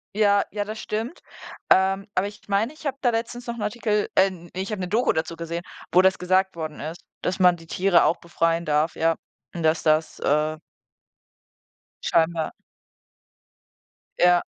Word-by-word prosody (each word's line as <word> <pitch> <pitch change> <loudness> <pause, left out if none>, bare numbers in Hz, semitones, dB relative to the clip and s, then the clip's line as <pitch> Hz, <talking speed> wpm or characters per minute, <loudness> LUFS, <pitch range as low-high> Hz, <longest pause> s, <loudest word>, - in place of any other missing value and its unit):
Ja, 205 -1 +4
ja, 205 -1 -2
das 215 +1 -7
stimmt. 225 +10 -4 0.5
Ähm, 195 +2 +3
aber 190 +2 +2
ich 205 0 -12
meine, 205 +7 +1
ich 310 - -15
habe 275 - -2
da 245 - +3
letztens 235 +1 -3
noch 235 - -3
'n 235 - -7
Artikel 210 0 0
ähm, 185 -3 +2
ich 190 +3 -4
habe 200 -3 -3
'ne 180 - -2
Doku 225 +6 +2
dazu 160 +1 -2
gesehen, 170 +1 -5 0.3
wo 180 - +6
das 190 0 +3
gesagt 185 +1 +1
worden 155 -2 -5
ist, 160 +3 -6 0.2
dass 185 +2 -2
man 180 -2 +5
die 165 0 -15
Tiere 185 -1 +3
auch 170 - +2
befreien 165 0 0
darf, 150 +2 +1
ja. 165 0 +2 0.4
Und 170 - -4
dass 160 0 +2
das, 155 0 +1
äh 155 +2 +1 1.5
Scheinbar. 165 -1 +1 1.7
Ja. 175 0 +5
185 Hz, 170 wpm, -24 LUFS, 165-210 Hz, 1.7 s, wo